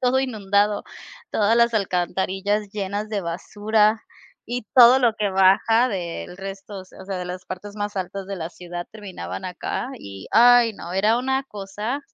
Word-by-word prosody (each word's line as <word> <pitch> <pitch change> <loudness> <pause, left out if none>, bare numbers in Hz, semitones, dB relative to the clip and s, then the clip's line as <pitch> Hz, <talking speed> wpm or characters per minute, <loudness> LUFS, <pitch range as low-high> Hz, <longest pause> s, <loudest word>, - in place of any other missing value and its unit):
todo 255 +1 +2
inundado, 205 -5 +1 0.5
todas 220 +2 +2
las 235 0 +4
alcantarillas 195 +1 -1
llenas 205 +1 -3
de 205 - -1
basura 210 +5 +1 0.4
y 245 +1 -3
todo 250 +1 +9
lo 240 -4 +3
que 210 -2 -1
baja 200 +6 +4
del 180 -3 -5
resto, 195 0 -7
o - - -11
se - - -18
o 190 - -9
sea, 190 -1 -4
de 180 - -4
las 180 +1 -6
partes 200 +3 -8
más 205 -1 -4
altas 190 +1 -4
de 195 - -4
la 165 -2 -5
ciudad 175 -1 -7
terminaban 185 - -7
acá, 180 +6 -4
y 100 - -10
ay, 240 -1 +6
no, 175 -3 -8
era 210 +4 +3
una 265 +2 0
cosa. 210 +4 -5
205 Hz, 175 wpm, -23 LUFS, 185-225 Hz, 0.5 s, todo